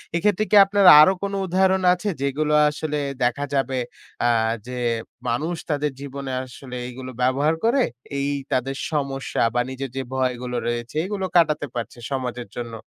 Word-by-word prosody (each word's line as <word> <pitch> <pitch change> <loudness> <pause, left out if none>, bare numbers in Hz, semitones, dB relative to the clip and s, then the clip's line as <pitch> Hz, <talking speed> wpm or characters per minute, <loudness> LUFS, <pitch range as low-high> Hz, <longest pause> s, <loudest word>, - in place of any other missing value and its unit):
এক্ষেত্রে 210 +4 +2
কি 210 - +5
আপনার 200 0 +2
আরো 170 +5 +7
কোনো 200 0 -2
উদাহরণ 190 +1 +2
আছে 195 +3 -3
যেগুলো 150 +2 0 0.2
আসলে 150 0 -3 0.3
দেখা 140 +4 0
যাবে 135 -1 0 0.5
আ 120 - +4 0.4
যে 125 - -6 0.5
মানুষ 155 +9 -1
তাদের 150 0 0
জীবনে 140 -1 -6
আসলে 125 0 -10
এইগুলো 130 +1 -8
ব্যবহার 140 +5 +2
করে 255 +4 +3 0.4
এই 140 - -1 0.2
তাদের 130 +2 0 0.2
সমস্যা 140 -3 -2
বা 120 - +3
নিজের 130 +1 -5
যে 135 - -1
ভয়গুলো 125 -1 -2
রয়েছে 120 +3 -3
এগুলো 195 -1 -3
কাটাতে 155 -3 +3
পারছে 120 0 -5
সমাজের 125 -2 -3
জন্য? 120 -1 -5
140 Hz, 155 wpm, -23 LUFS, 130-165 Hz, 0.5 s, আরো